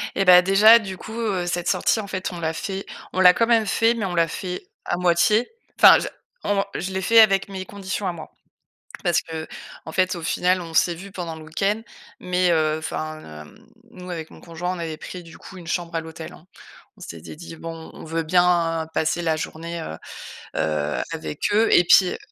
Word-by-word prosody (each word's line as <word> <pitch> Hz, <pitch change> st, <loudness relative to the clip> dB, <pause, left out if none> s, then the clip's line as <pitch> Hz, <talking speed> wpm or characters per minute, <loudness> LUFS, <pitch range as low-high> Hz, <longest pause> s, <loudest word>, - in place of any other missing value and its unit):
Eh 195 Hz, -, +1 dB
bah, 180 Hz, -1 st, +9 dB
déjà, 200 Hz, +5 st, +7 dB
du 190 Hz, -4 st, -7 dB
coup, 220 Hz, -, -9 dB
heu, 200 Hz, -6 st, -1 dB
cette 175 Hz, 0 st, -1 dB
sortie, 190 Hz, +4 st, +1 dB
en 200 Hz, -, -8 dB
fait, 190 Hz, -1 st, -4 dB
on 175 Hz, -, -7 dB
l'a 160 Hz, -1 st, -2 dB
fait 195 Hz, +4 st, -5 dB, 0.3 s
on 185 Hz, -, -2 dB
l'a 180 Hz, -1 st, +8 dB
quand 230 Hz, +4 st, +1 dB
même 230 Hz, -2 st, +3 dB
fait, 225 Hz, +3 st, +2 dB
mais 230 Hz, -4 st, -3 dB
on 180 Hz, -2 st, -3 dB
l'a 165 Hz, -1 st, +3 dB
fait 180 Hz, +2 st, -5 dB, 0.2 s
à 175 Hz, -, -1 dB
moitié. 180 Hz, +6 st, +2 dB, 0.3 s
Enfin -, -, +9 dB
je -, -, -4 dB, 0.4 s
on 200 Hz, -1 st, +1 dB
je 185 Hz, +2 st, -3 dB
l'ai 190 Hz, 0 st, -2 dB
fait 230 Hz, +4 st, +5 dB
avec 195 Hz, -3 st, +3 dB
mes 190 Hz, -1 st, -6 dB
conditions 195 Hz, 0 st, -5 dB
à 180 Hz, -, 0 dB
moi. 160 Hz, -2 st, -10 dB, 0.7 s
Parce 175 Hz, -2 st, +3 dB
qu'en 160 Hz, 0 st, -9 dB
fait, 185 Hz, +2 st, +1 dB
au 170 Hz, -, -7 dB
final, 180 Hz, +2 st, +1 dB
on 165 Hz, -1 st, -8 dB
s'est 175 Hz, -, +3 dB
vus 195 Hz, +4 st, -10 dB
pendant 170 Hz, -3 st, -5 dB
le 160 Hz, -, -11 dB
week-end, 200 Hz, +7 st, -1 dB, 0.4 s
mais, 180 Hz, 0 st, +1 dB
heu, 155 Hz, -1 st, +1 dB
enfin, 155 Hz, 0 st, -5 dB, 0.2 s
hem, 75 Hz, -, -18 dB, 0.2 s
nous 180 Hz, 0 st, -11 dB
avec 160 Hz, -2 st, -6 dB
mon -, -, -14 dB
conjoint, 175 Hz, +2 st, -5 dB
on -, -, -8 dB
avait 165 Hz, -2 st, -4 dB
pris, 180 Hz, +3 st, -9 dB
du 165 Hz, -1 st, -14 dB
coup, 190 Hz, -, -12 dB
une 170 Hz, -, -12 dB
chambre 170 Hz, 0 st, -3 dB
à 165 Hz, -, 0 dB
l'hôtel, 160 Hz, 0 st, -9 dB
hein. 165 Hz, -, -16 dB, 0.5 s
On -, -, -21 dB
s'était 80 Hz, -, -9 dB
dit: 165 Hz, 0 st, -10 dB
«Bon, 165 Hz, 0 st, -8 dB
on -, -, -11 dB
veut 165 Hz, +1 st, -2 dB
bien 170 Hz, -1 st, +2 dB
passer 160 Hz, +2 st, 0 dB
la 160 Hz, -1 st, +1 dB
journée, 165 Hz, +2 st, -5 dB
heu 80 Hz, -, -7 dB, 0.6 s
heu, 75 Hz, -1 st, -1 dB
avec 75 Hz, -1 st, -6 dB
eux» 220 Hz, +2 st, +4 dB
et 175 Hz, -, +6 dB
puis, 185 Hz, +2 st, +6 dB
heu -, -, -6 dB
175 Hz, 220 wpm, -23 LUFS, 165-190 Hz, 0.7 s, bah